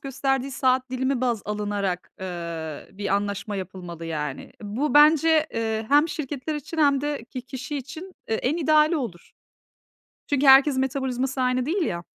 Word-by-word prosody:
gösterdiği 270 0 -1
saat 260 -1 +1
dilimi 260 0 -1
baz 240 -5 0
alınarak, 205 -3 -2
ııı, 170 -4 -6
bir 200 0 -2
anlaşma 200 0 -2
yapılmalı, 180 -3 -7
yani. 150 -4 -4
Bu 240 +10 -2
bence, 310 +1 +6
ııı, 220 -1 -1
hem 295 +3 +5
şirketler 300 0 -4
için 300 +3 -6
hem 280 -3 +4
de 290 -4 -3
ki 250 +1 -7
kişi 265 +3 -6
için, 280 +4 -7 0.3
ııı, 220 - +1
en 285 +7 0
ideali 310 0 +4
olur. 210 - -6 1.0
Çünkü 285 -1 +1
herkesin 270 0 +7
metabolizması 265 0 -1
aynı 255 0 +1
değil 355 +4 0
ya. 170 - -2
255 Hz, 155 wpm, -24 LUFS, 205-285 Hz, 1.0 s, herkesin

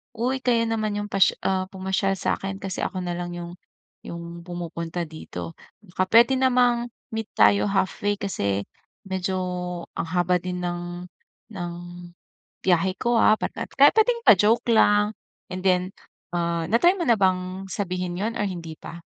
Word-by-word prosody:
"Uy 250 +3 -1
kayo 235 -2 +3
naman 215 -2 -1
'yong 205 0 -4
pas 195 -1 +5 0.2
ah, 185 -1 0
pumasyal 190 0 -1
sa'kin 195 +1 -2
kasi 190 -1 -4
ako 185 -1 -3
na 175 - -3
lang 175 0 -4
'yong, 175 0 -7 0.5
'yong 170 0 -7
pumupunta 170 -1 -4
dito, 155 +1 -7 0.3
baka 185 -2 -2
puwede 235 +3 +6
namang, 245 -2 +3 0.3
meet 220 -1 -3
tayo 200 +1 +5
halfway? 200 +1 0
Kasi, 100 - -1 0.4
medyo 190 0 -2 0.6
ang - - -2
haba 180 +1 +2
din 180 0 -4
ng 175 0 -4 0.5
ng 175 -3 -4 0.9
biyahe 185 +1 +2
ko 240 0 +1
ah", 215 - +6
bat - - -2
nat - - -5
kahit 280 +1 +6
puwedeng 470 +2 +3
pa-joke 210 +4 +5
lang, 210 0 +4 0.4
and 185 0 -5
then, 185 0 +2 0.4
ah, 170 -1 0
na-try 240 - +5
mo 345 - -1
na 235 - +6
bang 185 0 0
sabihin 180 -2 -3
'yon, 225 +3 -2
or 205 - +1
hindi 170 -4 -6
pa? 170 - -9
190 Hz, 155 wpm, -24 LUFS, 175-215 Hz, 0.9 s, puwede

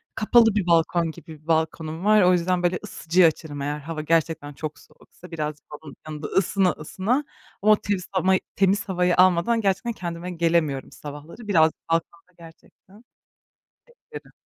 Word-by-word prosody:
Kapalı 225 0 +4
bir 195 -4 0
balkon 165 0 +2
gibi 160 -2 -13
bir 155 - -27
balkonum 160 +1 -1
var. 215 0 +5
O 180 -1 +5
yüzden, 180 0 0
böyle, 175 0 +1
ısıtıcıyı 180 -3 +2
açarım 150 -2 -4
eğer 145 +1 -3
hava 155 +1 -6
gerçekten 160 -2 0
çok 155 +1 -7
soğuksa, 180 0 -18
birazcık 150 -2 -5 0.2
onun 145 - -10
yanında 155 -1 -6
ısına 190 0 +1
ısına. 185 +8 -5 0.5
Ama 215 +2 +4
o - - +5
temiz 205 -3 -3
hama 190 0 +2 0.2
temiz 195 +1 +1
havayı 180 -1 +1
almadan 185 +5 +3
gerçekten 195 +3 0
kendime 175 -2 -6
gelemiyorum 165 -5 0
sabahları. 150 +9 -10
Birazcık 160 -6 +2
balkonda 165 +2 -3
gerçekten 175 +5 -18 1.1
beklerim. - - -10
170 Hz, 155 wpm, -24 LUFS, 160-190 Hz, 1.1 s, var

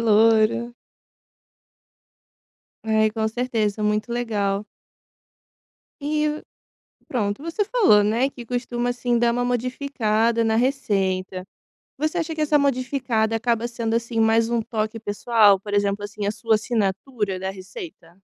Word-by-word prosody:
louro. 225 +1 +3 2.1
Ai, 220 -1 +2
com 220 0 -1
certeza, 225 -3 -1
muito 210 +2 0
legal. 210 -4 -1 1.3
E 300 +1 -1 0.7
pronto, 210 +1 -2
você 335 +6 -1
falou, 390 - +5
né, 230 +6 +1
que 245 -3 -11
costuma, 245 0 -2
assim, 245 -1 0
dar 235 0 +3
uma 245 - 0
modificada 235 -2 0
na 220 0 +1
receita. 195 -8 0 0.6
Você 310 +4 -1
acha 330 -1 -2
que 315 - -5
essa 300 0 +3
modificada 255 -4 0
acaba 235 0 0
sendo, 230 -1 -3
assim, 235 0 -2
mais 225 +1 +3
um 235 -1 0
toque 220 0 -3
pessoal, 205 -1 +3
por 205 +1 -6
exemplo, 205 0 0
assim, 205 0 -5
a 205 - +1
sua 220 +1 0
assinatura 210 -1 -1
da 190 0 -2
receita? 190 - -11
230 Hz, 130 wpm, -23 LUFS, 210-245 Hz, 2.1 s, falou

